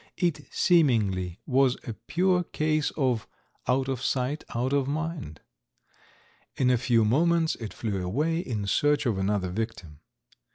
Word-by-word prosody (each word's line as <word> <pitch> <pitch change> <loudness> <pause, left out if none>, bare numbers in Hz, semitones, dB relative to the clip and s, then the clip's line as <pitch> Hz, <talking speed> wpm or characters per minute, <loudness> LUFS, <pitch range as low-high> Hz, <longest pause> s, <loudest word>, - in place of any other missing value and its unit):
It 175 -5 -1
seemingly 105 - +2
was 135 -2 +3
a 115 - -3
pure 180 - +1
case 155 -2 0
of 125 -6 0 0.4
"out 130 +1 +2
of 130 -2 -2
sight, 135 +4 -1
out 125 +3 0
of 140 -2 +2
mind." 150 - -4 1.1
In 125 -1 +2
a 125 - +4
few 115 -3 +3
moments 165 +7 +3
it 110 -3 -6
flew 100 -5 -3
away 150 - 0
in 110 - -3
search 145 +6 +2
of 110 -6 0
another 95 -1 0
victim. 95 -8 -5
130 Hz, 140 wpm, -27 LUFS, 110-155 Hz, 1.1 s, a